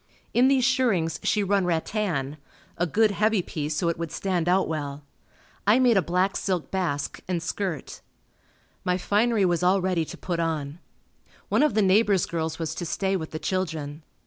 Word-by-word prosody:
In 250 +2 +5
these 265 -2 +3
shirrings 235 - +1
she 210 - +1
run 200 0 +2
rattan 165 -4 -1 0.4
a 175 - 0
good 215 +6 +3
heavy 210 -1 +1
piece 150 -2 -3
so 170 +3 0
it 170 0 -1
would 165 -2 -4
stand 175 -1 -1
out 185 +1 +3
well. 145 -2 -4 0.6
I 210 +3 +6
made 250 -3 +4
a 195 - +5
black 180 +3 0
silk 185 -4 -2
basque 170 -7 -2
and 175 -3 -2
skirt. 180 -4 -4 0.8
My 180 0 +1
finery 210 +2 +2
was 175 -1 +1
all 185 +2 +4
ready 180 -3 0
to - - -9
put 175 -2 -3
on. 155 -2 -2 0.7
One - - +3
of 300 -8 +2
the 215 - +4
neighbor's 195 0 +4
girls 160 -1 -3
was 160 -2 -3
to - - -2
stay 195 +3 0
with 160 -4 -3
the 155 - -5
children. 160 -5 -3
180 Hz, 180 wpm, -25 LUFS, 160-200 Hz, 0.8 s, I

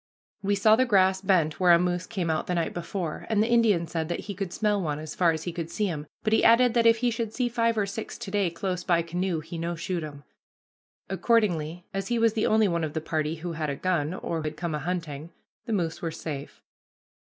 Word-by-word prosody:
We 200 +1 +1
saw 215 +2 +5
the 255 +3 +3
grass 190 -3 +4
bent 170 -6 +2
where 180 -2 +6
a - - +8
moose 180 +1 -1
came 180 -7 -2
out 155 - -1
the 180 - 0
night 170 -1 -1
before, 175 -1 -4
and 220 -2 +2
the - - 0
Indian 220 -8 +4
said 165 0 -3
that 175 - -2
he 205 - -6
could 195 -2 -4
smell 210 0 +1
one 150 -4 -2
as 155 0 -7
far 175 -2 +3
as 160 0 -4
he 175 - -3
could 165 -1 -4
see 210 - -1
him, 155 -6 -4 0.2
but 215 - +1
he - - +4
added 230 +1 +6
that 235 -1 +4
if 230 0 +6
he 245 +1 +1
should 225 -1 -3
see 250 -1 +1
five 230 -1 +1
or 205 - +2
six 200 +3 -6
to 225 -5 -7
day 200 -3 +1
close 180 +1 -3
by 170 -2 +2
canoe 175 0 -2
he 165 +2 -7
no 170 +1 -2
shoot 170 0 -3
'em. 145 -2 -8 0.8
Accordingly, 175 -8 +1
as 195 0 -3
he 240 - 0
was 230 -1 +3
the 220 - +1
only 220 -1 +4
one 170 -2 0
of 155 -2 -3
the 160 - -1
party 155 0 -2
who 170 +2 -5
had 160 -2 -3
a 140 - -2
gun, 170 0 -1
or 165 -3 -3
had 155 0 -4
come 170 -1 -3
a 150 - -1
hunting, 160 -2 -4 0.4
the 225 - -1
moose 170 -5 -1
were 165 - -1
safe. 150 -3 -7
180 Hz, 250 wpm, -27 LUFS, 160-210 Hz, 0.8 s, a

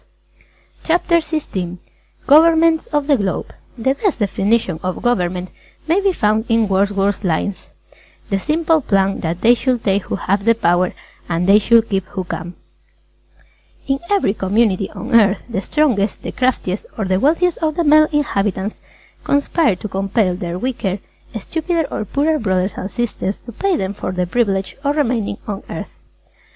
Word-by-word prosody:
CHAPTER 340 +1 +2
XVI 200 - -3 0.5
GOVERNMENTS 325 +2 +5
OF 295 -2 0
THE 285 -2 +3
GLOBE 195 -4 -2 0.3
The 265 +3 +1
best 345 +6 -1
definition 200 -3 0
of 185 0 -4
Government 180 -6 0 0.4
may 345 +5 +2
be 395 -1 +3
found 215 - +1
in 225 -1 +3
Wordsworth's 200 +1 +1
lines: 185 +2 -2 0.6
"The 195 - +1
simple 320 - +1
plan 195 -4 +1
That 170 +2 -3
they 235 +2 +6
should 245 -1 -1
take 195 -1 +1
who - - -3
have 200 +1 -1
the 230 0 +5
power 175 -3 +1 0.4
And 170 +1 0
they 200 +3 +6
should 230 +1 +4
keep 195 -2 -1
who 190 -2 -4
can." 175 0 -6 1.3
In 270 0 0
every 395 - +2
community 200 -1 +1
on 240 +2 -7
Earth, 210 -4 +4
the 230 -5 -3
strongest, 230 -8 0
the - - -4
craftiest 245 -7 -1
or 215 - -1
the 185 0 +1
wealthiest 335 - +2
of 310 -2 -1
the 340 - +1
male 305 0 +6
inhabitants 205 -8 -1 0.5
conspire 285 - +2
to 195 - -6
compel 195 0 0
their 175 -2 -4
weaker, 205 -4 -2 0.4
stupider 325 - -1
or 215 - -3
poorer 300 +8 0
brothers 190 -2 0
and 190 - -5
sisters 215 -4 -3
to 240 - -11
pay 390 - 0
them 190 -5 -2
for 190 - -4
the 180 -1 -1
privilege 195 -1 -1
of 285 +1 +1
remaining 230 -8 0
on 200 -2 -4
earth. - - -6
215 Hz, 160 wpm, -18 LUFS, 190-285 Hz, 1.3 s, they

